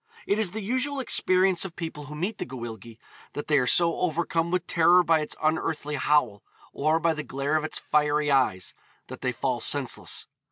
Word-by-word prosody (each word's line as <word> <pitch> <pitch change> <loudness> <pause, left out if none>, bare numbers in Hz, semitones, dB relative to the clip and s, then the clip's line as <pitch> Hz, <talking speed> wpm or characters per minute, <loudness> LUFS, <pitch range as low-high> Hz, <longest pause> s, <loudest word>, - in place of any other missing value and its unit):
It 205 - 0
is 215 -4 +3
the 215 +3 -6
usual 260 +6 -1
experience 185 -7 +2
of 185 -3 -8
people 160 -3 -6
who 150 +1 -9
meet 190 +8 -3
the - - -3
Gwyllgi 115 -3 -8 0.4
that 145 - -5
they 150 -2 +3
are 125 - 0
so 170 +2 +3
overcome 170 0 0
with 180 -1 -1
terror 175 +2 +4
by 165 -2 +3
its 150 - -3
unearthly 155 -1 -1
howl, 130 -7 +1 0.3
or 155 +3 +1
by 165 0 +1
the 150 - -4
glare 140 +1 -2
of 155 - +1
its 155 - -4
fiery 150 0 +1
eyes, 125 -10 +1 0.4
that - - -9
they - - 0
fall - - -2
senseless. - - 0
155 Hz, 195 wpm, -26 LUFS, 145-175 Hz, 0.4 s, terror